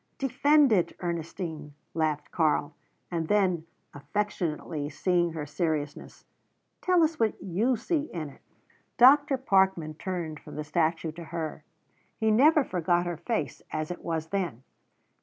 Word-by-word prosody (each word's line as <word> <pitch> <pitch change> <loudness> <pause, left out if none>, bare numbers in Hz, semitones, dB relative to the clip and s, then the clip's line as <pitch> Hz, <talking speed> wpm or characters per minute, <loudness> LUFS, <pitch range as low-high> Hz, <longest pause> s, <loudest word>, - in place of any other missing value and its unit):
"Defend 280 +1 +4
it, 185 -5 +2
Ernestine," 165 -3 -4 0.2
laughed 155 -2 -1
Karl; 155 -3 +1 0.4
and 165 -2 -1
then, 185 -5 +2 0.3
affectionately, 160 -3 -3
seeing 175 +2 +1
her 155 -2 -4
seriousness, 150 -1 -3 0.6
"Tell 360 -2 +4
us 315 0 0
what 225 -2 +2
you 220 +8 0
see 305 +6 -1
in 160 -4 -4
it." 135 - -17 0.6
Dr. 280 +3 +6
Parkman 190 - +2
turned 165 -2 -4
from - - -11
the 150 - -3
statue 160 +1 0
to 165 +2 -9
her. 160 -2 -5 0.6
He 220 0 +3
never 295 +7 +5
forgot 175 -3 0
her 175 -2 -3
face 220 +7 -3
as 155 +2 -3
it 175 - -7
was 160 -1 -3
then. 175 - -2
175 Hz, 140 wpm, -28 LUFS, 155-215 Hz, 0.6 s, Dr